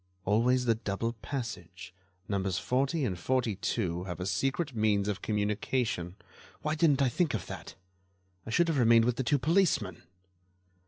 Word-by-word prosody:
"Always 125 +5 +3
the 115 - +4
double 110 +1 -3
passage—numbers 95 -5 -5
40 135 +4 0
and 90 -6 -2
42 100 -6 -1
have 90 -3 -6
a 90 - -3
secret 135 - -1
means 105 -2 +2
of 100 -2 -2
communication. 105 -3 -1 0.5
Why 150 - 0
didn't 150 -4 +3
I - - +3
think 150 +1 0
of 100 - -4
that? - - -8 0.7
I - - -9
should 170 +9 +3
have 160 -4 +1
remained 115 -1 +6
with 120 0 0
the 130 - 0
two 145 +4 +2
policemen." 145 - +1
115 Hz, 150 wpm, -30 LUFS, 95-130 Hz, 0.7 s, remained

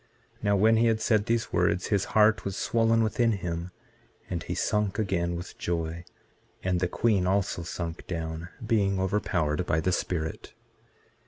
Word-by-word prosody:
Now, 100 -1 +2
when 110 +3 +4
he 115 +1 +4
had 110 -1 +2
said 110 -1 +2
these 115 0 0
words, 90 +1 +1
his 100 -3 +2
heart 110 +1 +5
was 100 -1 -4
swollen 115 0 +2
within 115 +1 +2
him, 85 -2 -4 0.6
and 85 -2 -2
he - - -4
sunk 105 -2 0
again 90 -5 0
with 85 +1 -8
joy; 85 0 -3 0.6
and 90 -1 +1
the 90 - +1
queen 100 -1 +1
also 95 -2 0
sunk 85 0 -5
down, 80 0 -4 0.2
being 100 -4 +2
overpowered 90 -4 0
by 80 - +2
the 90 +3 0
Spirit. 80 -3 -3
95 Hz, 160 wpm, -28 LUFS, 85-110 Hz, 0.6 s, heart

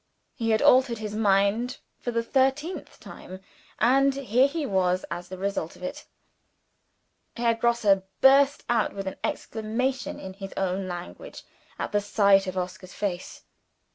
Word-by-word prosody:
He 230 -4 -2
had 220 -1 +2
altered 255 -2 +5
his 210 -1 -5
mind 210 +4 +2 0.2
for - - -4
the 230 -1 0
thirteenth 270 +8 -1
time 185 0 -10 0.4
and 270 +4 +3
here 260 -1 +3
he 305 +1 -3
was 185 -4 +1
as 175 +1 -5
the 185 - -7
result 195 -4 -3
of - - -14
it! 180 - -6 1.3
Herr 235 0 +2
Grosse 235 0 0 0.3
burst 275 +1 +5
out 235 -2 +1
with 195 -1 -5
an 190 - -5
exclamation 230 +5 -2
in 190 0 -8
his 195 0 -8
own 190 0 -1
language, 180 - -8 0.3
at - - -4
the 205 - +1
sight 200 -1 +3
of 185 0 -4
Oscar's 185 0 -5
face. 185 -3 -4
215 Hz, 150 wpm, -26 LUFS, 190-255 Hz, 1.3 s, altered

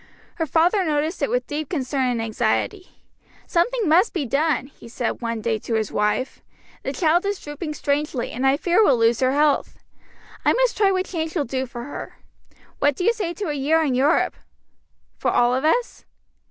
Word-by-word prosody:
Her 325 -2 -1
father 345 +7 +3
noticed 310 +1 -1
it 280 - +1
with 250 0 0
deep 295 -1 -4
concern 265 -4 -1
and 240 -2 -1
anxiety. 235 - -2 0.4
"Something 425 +5 +1
must 355 +8 +4
be 330 -6 -1
done," 285 +3 +1
he 270 - -15
said 240 +1 -3
one 230 -1 -3
day 220 0 -1
to 225 - -3
his 220 -2 -1
wife; 210 +5 -1 0.4
"the - - -3
child 340 0 +2
is 400 -1 -2
drooping 300 +1 -6
strangely, 285 -3 -1
and 260 +3 0
I 270 +1 +3
fear 355 +7 +3
will 275 -11 +4
lose 230 0 +3
her 260 0 +2
health. 295 0 +1 0.7
I - - +4
must - - +2
try 405 -3 +3
what 370 -1 0
change 320 -2 -4
will 300 -4 0
do 260 +2 -3
for 240 0 -7
her. 285 - -8 0.6
What 290 -1 +2
do 360 - -3
you 460 - +4
say 370 -6 -3
to 405 -5 -4
a - - -1
year 300 +3 +2
in 280 -4 0
Europe?" 275 +6 +2 0.8
"For - - +1
all 245 0 +3
of 260 +2 0
us?" 475 +10 0
295 Hz, 195 wpm, -22 LUFS, 255-345 Hz, 0.8 s, must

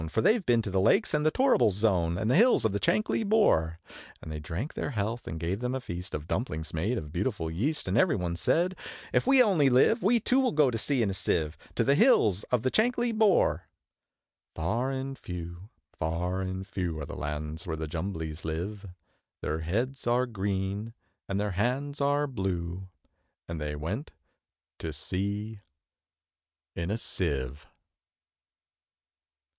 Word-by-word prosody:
For 110 - 0
they've 220 - +3
been 120 -6 +3
to 100 - -4
the 95 0 +2
Lakes, - - +3
and 150 0 +2
the 155 - +4
Torrible 260 - +4
Zone, 90 -4 +1
And 110 +3 -1
the - - +4
hills 235 - +5
of 110 - +3
the 100 - -1
Chankly 215 - +1
Bore!' 140 - +3 0.4
And 80 - -9
they 75 - -4
drank 85 - -4
their - - -3
health, 115 -1 -3
and 80 - -4
gave 85 +5 -2
them 125 +1 -2
a - - -1
feast 90 -6 -6
Of 75 +1 -6
dumplings 80 +1 -3
made 100 +10 0
of 75 -6 -6
beautiful 90 -2 -2
yeast; 140 - -1
And - - 0
every 185 -3 +4
one 90 -3 -2
said, 175 - +1 0.4
`If - - +2
we 265 -1 +7
only 170 - +4
live, 135 - +4
We 235 +5 +4
too 250 +4 +2
will 260 -2 +2
go 150 -4 +4
to 115 - -2
sea 130 -1 +1
in 100 - 0
a - - -3
Sieve, 80 -4 -1 0.2
To - - +2
the 140 - +4
hills 125 - +4
of 125 -2 0
the 130 - +1
Chankly 240 +1 +2
Bore!' 215 -3 +3 0.9
Far 110 +11 0
and 135 0 -4
few, 85 +2 -7 0.3
far 90 +4 -1
and 95 0 -4
few, 90 -4 -3
Are - - -4
the - - -8
lands 75 +2 -5
where 80 -1 -2
the 80 - -3
Jumblies 80 -1 -4
live; 95 +6 -4 0.5
Their 80 - -2
heads 120 - -2
are 120 +2 +3
green, 100 0 -3 0.3
and 100 0 0
their 105 0 -1
hands 130 - -1
are 145 +1 +2
blue, 95 -6 -3 0.6
And 85 -2 -5
they 75 0 -3
went 95 - -4 0.7
to - - -4
sea 100 +3 -3 1.2
in 85 +1 -3
a 105 - 0
Sieve. 75 - -3
100 Hz, 175 wpm, -29 LUFS, 85-135 Hz, 1.2 s, we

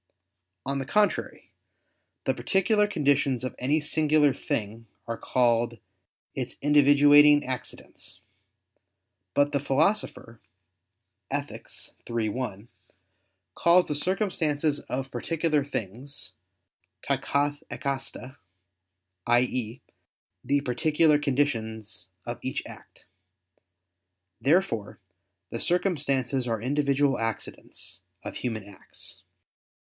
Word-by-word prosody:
On 140 +1 -1
the 135 - -3
contrary, 210 +6 0 0.7
The - - +2
particular 210 +2 +2
conditions 140 - +1
of 130 - -3
any 145 +5 +2
singular 150 -1 +3
thing 115 -2 -4 0.2
are 115 - -2
called 120 -1 +1 0.6
its - - -4
individuating 145 0 +6
accidents. 130 -1 -6 1.2
But 145 0 +3
the 140 - +1
Philosopher 140 - 0 0.9
(Ethic. - - -4 0.4
iii, 115 -2 0
1) 105 -2 -4 0.9
calls 175 +1 +5
the - - -2
circumstances 155 -4 0 0.3
particular 155 +3 0
things 130 +1 -5 0.8
[*_ta - - +1
kath' 145 +1 0
ekasta_], 135 -1 -4 0.9
i.e. 120 0 +1 0.6
the 140 +2 +2
particular 150 +4 +3
conditions 115 -7 -1 0.2
of - - -5
each - - -3
act. - - -13 1.4
Therefore 135 - +1 0.5
the 115 - -4
circumstances 140 -8 0
are 115 -2 -1
individual 140 +1 +1
accidents 115 -1 -3 0.2
of - - -6
human 115 -4 -3
acts. 100 - -7
140 Hz, 90 wpm, -27 LUFS, 120-150 Hz, 1.4 s, individuating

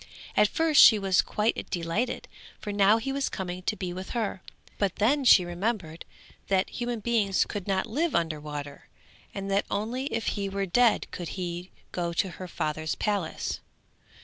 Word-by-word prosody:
At 210 - +5
first 320 +4 +4
she 220 - +9
was 195 -2 +3
quite 215 +2 -1
delighted, 175 +8 -2 0.3
for 205 - -5
now 200 +2 +5
he 250 +4 -3
was 275 0 -1
coming 180 -2 -5
to 215 - -1
be 180 -3 -4
with 185 +1 -7
her, 205 -5 -2 0.4
but 195 -3 +1
then 270 +7 +2
she 190 -8 +7
remembered 175 -2 -3 0.4
that 190 -1 +1
human 240 -2 -3
beings 210 -4 +2
could 205 -2 -6
not 190 -1 +1
live 295 +8 -1
under 165 -3 0
water, 145 -1 -7 0.4
and 195 0 -5
that 200 +1 +1
only 235 +6 -2
if 230 -4 -2
he 200 -2 -2
were 195 0 -2
dead 235 +5 +3
could 175 -3 -5
he 175 0 -4 0.2
go 170 -1 -2
to 190 +3 +1
her 185 +1 -8
father's 155 -2 -2
palace. 200 -6 -2
195 Hz, 175 wpm, -27 LUFS, 175-225 Hz, 0.4 s, she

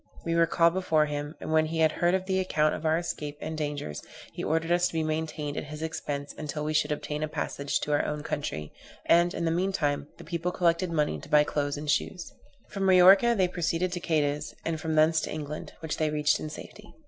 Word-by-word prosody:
We 165 - 0
were 165 0 +4
called 170 0 +3
before 160 -5 +2
him, 145 +1 -4
and - - -5
when 155 0 +3
he 165 +1 -4
had 160 -1 +5
heard 185 +3 +1
the 190 0 0
account 155 -5 +1
of 160 - -3
our 160 +1 +3
escape 150 -4 -4
and 160 - -5
dangers, 145 - -4 0.3
he - - -5
ordered 165 +1 0
us 175 +1 +4
to - - -9
be 160 -1 0
maintained 155 -2 -3
at - - -3
his 150 +1 -7
expense 145 -3 -4
until 150 0 -4
we 155 +1 -1
should 150 0 +1
obtain 150 0 -3
a 155 - 0
passage 140 -1 -2
to 150 - -2
our 145 - +2
own 150 0 -3
country; 80 - -4 0.3
and, 170 +1 +4
in 170 - -2
the 165 - +1
meantime, 165 -6 0
the - - -11
people 170 +1 -2
collected 175 0 +1
money 150 - 0
to - - -12
buy 150 0 +6
clothes 145 -1 -2
and 150 0 -1
shoes. 175 +4 -2 0.4
From 195 - -4
Majorca 190 +5 +7
they 185 -2 +3
proceeded 175 0 -1
to 175 - -3
Cadiz, 150 -3 -1
and 160 -1 -2
from 160 -1 -1
thence 155 +1 +4
to - - -4
England, 150 0 -6
which 160 -2 -3
they 155 -1 +1
reached 150 -1 +2
in 155 - -5
safety. 210 +6 -11
155 Hz, 230 wpm, -28 LUFS, 150-170 Hz, 0.4 s, Majorca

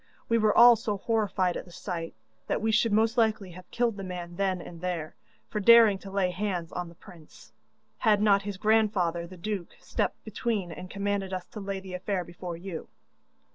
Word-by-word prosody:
We 230 0 +3
were 215 -1 +3
all 240 0 +9
so 210 -2 -3
horrified 200 -4 0
at - - -5
the 175 - -15
sight, 170 -2 -5 0.3
that - - 0
we 220 +1 0
should 225 +1 +3
most 225 +3 +2
likely 215 -4 +1
have 180 +1 -13
killed 235 -3 0
the 195 - -6
man 175 -2 -6
then 190 -1 0
and 170 -1 -10
there, 175 -4 -3 0.3
for 210 - -3
daring 225 -2 +7
to 195 - -10
lay 190 -2 0
hands 180 -3 -3
on 175 -1 -4
the 170 - -15
prince, 165 -2 -16 0.5
had 215 -3 +4
not 200 -1 +4
his 200 -1 -5
grandfather 195 -6 +2
the 185 +1 -12
duke 195 -1 -4
stepped - - -2
between 210 -4 -2
and 180 +3 -8
commanded 200 -1 -2
us 185 -1 -4
to - - -8
lay 195 -1 -4
the 190 -1 -10
affair 185 0 -2
before 175 0 -7
you. 175 -2 -7
195 Hz, 200 wpm, -28 LUFS, 180-215 Hz, 0.5 s, all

